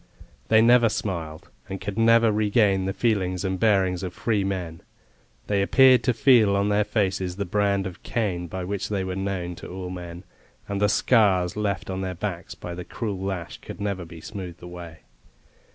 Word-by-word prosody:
They 110 0 +5
never 120 0 +6
smiled, 85 -7 -5 0.2
and 95 0 -5
could 100 0 -5
never 115 0 +5
regain 105 -2 +2
the 95 - -1
feelings 95 -4 0
and 95 -1 -2
bearing 95 -5 +2
of 90 -1 -5
free 110 -4 0
men; 90 -4 -4 0.6
they 100 -1 +1
appeared 130 +5 +5
to 125 - +3
feel 115 -5 +5
on 100 +1 +1
their 105 +1 +3
faces 95 -4 -1
the 100 +1 -3
brand 100 0 +1
of 90 -2 -7
Cain, 95 -7 -2
by 90 +2 -5
which 100 +2 -3
they 100 -2 -1
were 95 0 -4
known 95 -2 -3
to - - -9
all 90 0 -6
men, 90 -1 -8 0.4
and 100 0 -3
the 105 - +4
scars 100 -5 +3
left 100 -2 -2
on 95 0 -3
their 95 -1 -3
backs 90 -1 -5
by 90 - -7
the 90 +1 -6
cruel 105 -1 -4
lash 95 -3 -4
could - - -10
never 100 -3 -2
be 85 -1 -11
smoothed 90 -4 -8
away. 85 -2 -9
95 Hz, 185 wpm, -25 LUFS, 90-105 Hz, 0.6 s, never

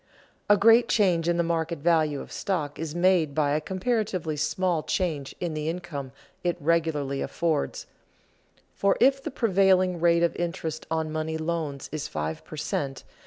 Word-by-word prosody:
_ - - -40 0.5
A 205 - +7
great 230 +3 +6
change 175 -6 +2
in 170 - +2
the 170 - +2
market 165 0 -1
value 155 -2 +2
of - - -11
stock 155 -7 -3
is 160 -1 -4
made 175 -5 +3
by 145 -2 +2
a 150 +1 +1
comparatively 190 -4 -1
small 165 +3 0
change 155 -6 -2
in 175 -3 -2
the 155 0 -2
income 160 -6 -5 0.3
it 175 -1 0
regularly 150 -4 0
affords, 160 -3 -1 0.9
for 200 0 +2
if 270 +1 +4
the 310 - -4
prevailing 190 - +3
rate 170 0 +4
of 170 - +1
interest 170 -2 -4
on 160 -1 -1
money 155 0 -2
loans 155 -4 -3
is 155 0 -3
five 80 +1 -4
per 155 - -10
cent. 140 -2 -3
165 Hz, 165 wpm, -26 LUFS, 150-185 Hz, 0.9 s, A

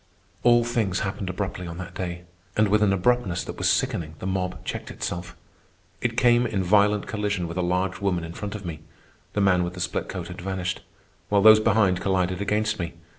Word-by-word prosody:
All 120 -1 +5
things 115 -6 0
happened 95 -1 -3
abruptly 95 -1 -4
on 85 0 -7
that 90 - -7
day, 90 -1 -5 0.3
and 105 -1 +4
with 105 +1 +3
an 105 -2 +4
abruptness 95 -1 +1
that - - -7
was - - +2
sickening 80 -2 0
the - - -8
mob 95 -1 -2
checked - - -5
itself. 85 0 -5 0.7
I - - +4
came 120 +1 +3
in 95 -3 -1
violent 105 +2 +3
collision 100 -4 -2
with 85 - -6
a - - +1
large 90 +2 -1
woman 90 -4 0
in 80 0 -7
front 105 +3 -5
of 100 -2 -7
me 80 -3 -5 0.5
(the 105 - 0
man 90 -2 +4
with 90 +1 -4
the - - -7
split 90 - -2
coat - - -5
had - - -8
vanished), 95 -1 -3 0.5
while 100 -1 +3
those 110 0 +9
behind 105 -4 +3
collided 95 -1 0
against 105 +1 0
me. 85 -2 -3
95 Hz, 205 wpm, -25 LUFS, 90-105 Hz, 0.7 s, those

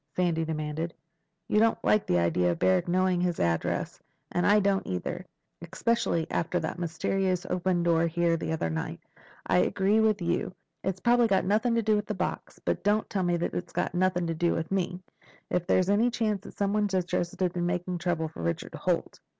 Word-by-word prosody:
Sandy 170 -3 +1
demanded. 160 +1 -3 0.5
"You 210 - +2
don't 225 +1 +3
like 215 - +3
the 90 - +2
idea 85 +1 +2
of 85 - -3
Barrack 95 +1 +2
knowing 185 0 +2
his 180 -2 0
address, 85 -1 -1 0.3
and 175 - +1
I 210 +1 +6
don't 200 -1 +1
either. 90 -1 -4 0.4
Especially 210 -5 0
after 175 +2 0
that 165 +2 -4
mysterious 180 +2 -1
open 180 -1 +1
door 170 -1 +3
here 170 0 +1
the 165 - -3
other 155 - -1
night. 80 - -4 0.5
I 90 -1 +3
agree 195 - +2
with 215 -2 +3
you. 175 +2 -1 0.3
It's 190 0 -2
probably 240 0 +4
got 195 -3 +2
nothing 220 +5 +2
to 230 - +1
do 215 0 +3
with 210 0 -2
the - - -2
box. - - -4
But - - -2
don't 210 +1 +2
tell 195 - 0
me 175 -1 +1
it's 175 +1 -3
got - - -1
nothing 180 -1 +1
to 165 - -1
do 170 +1 +1
with 165 +2 -3
me—if 180 -1 -4
there's 185 -1 +3
any 220 +4 +3
chance 215 -4 -1
that - - -11
somebody's 200 0 +1
interested 180 0 -1
in 175 0 0
making 180 0 -2
trouble 165 -2 -1
for 120 - -9
Richard 85 0 -3
Holt." - - -2
180 Hz, 190 wpm, -28 LUFS, 165-195 Hz, 0.5 s, I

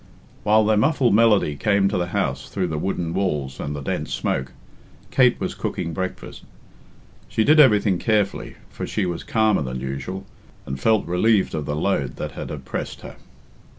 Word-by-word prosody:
While 110 +1 +4
their 110 0 +3
muffled 130 -1 +3
melody 105 -8 +4
came 100 +3 +2
to - - -1
the 85 - -1
house - - -2
through 90 -2 -2
the 80 -1 -2
wooden 85 -2 -2
walls 75 -9 -2
and 75 +1 -4
the 70 - -6
dense - - -3
smoke, 65 +1 -2 0.6
Kate 125 -2 +4
was - - -3
cooking 85 -2 -4
breakfast. 95 +3 -5 0.9
She 110 - +1
did 155 +6 +5
everything 105 -9 +5
carefully, 105 -3 0 0.2
for - - -5
she 105 - -1
was 85 -2 -3
calmer 110 -4 +2
than 65 -2 -4
usual, 70 +9 -5 0.4
and 65 0 -5
felt 110 +6 +2
relieved 100 +3 +2
of 75 -2 -3
the 75 - -1
load 75 -6 -1
that - - -5
had - - -7
oppressed - - -5
her. - - -10
95 Hz, 175 wpm, -22 LUFS, 75-110 Hz, 0.9 s, did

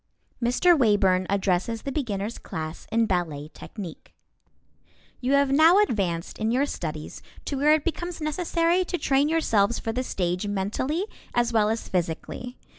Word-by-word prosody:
MR. 250 +9 +4
WAYBURN 200 - +3
ADDRESSES 200 +3 0
THE 275 - -3
BEGINNERS' 225 -6 -3
CLASS 155 0 -6
IN 230 0 +3
BALLET 160 -6 -2
TECHNIQUE 190 -7 -9 1.1
You 260 +2 0
have 280 -1 +3
now 320 +6 +6
advanced 195 - 0
in 220 0 0
your 255 +4 +2
studies 155 - -6 0.2
to 285 - -3
where 295 +3 +5
it 310 - -2
becomes 345 +1 -3
necessary 335 +3 +1
to 355 0 -3
train 280 -1 +2
yourselves 235 -9 +2
for 225 - -3
the 250 +3 -1
stage 180 -5 -2
mentally 210 - -1 0.3
as 240 -1 +2
well 215 -2 +3
as 225 +1 -2
physically. 180 +8 -3
230 Hz, 150 wpm, -25 LUFS, 190-290 Hz, 1.1 s, now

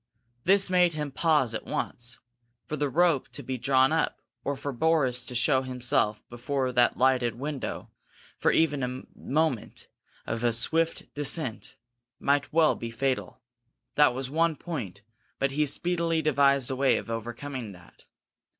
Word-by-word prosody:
This 195 +1 +5
made 180 -2 +3
him 150 -2 -3
pause 150 -5 +2
at 110 - -5
once. 120 0 -4 0.5
For 155 - -4
the 145 -1 -1
rope 165 -1 +2
to 145 - -4
be 130 0 -4
drawn 130 +2 +3
up, 160 0 0 0.2
or 140 0 -2
for 140 - -4
Boris 130 -3 +2
to 125 - -6
show 130 +2 +3
himself 125 -4 -1
before 130 +2 -2
that 120 -1 +3
lighted 125 -2 +2
window 140 +2 -5 0.5
for - - +3
even 150 -3 +2
the 125 0 -4
moment 150 -5 -2 0.4
of 115 +1 -3
a 120 -1 +2
swift 160 +8 0
descent, 145 -4 0 0.4
might 140 -1 +1
well 160 -1 +4
be 115 - -6
fatal. 130 +1 -2 0.5
That 150 -4 +4
was 130 0 -3
one 165 +3 +1
point, 115 - -6 0.3
but 135 0 0
he 150 +2 +1
speedily 165 +1 0
devised 140 -3 +3
a - - -1
way 135 +1 +3
of 115 - -6
overcoming 120 +1 -5
that. 90 -1 -18
135 Hz, 155 wpm, -27 LUFS, 125-155 Hz, 0.5 s, This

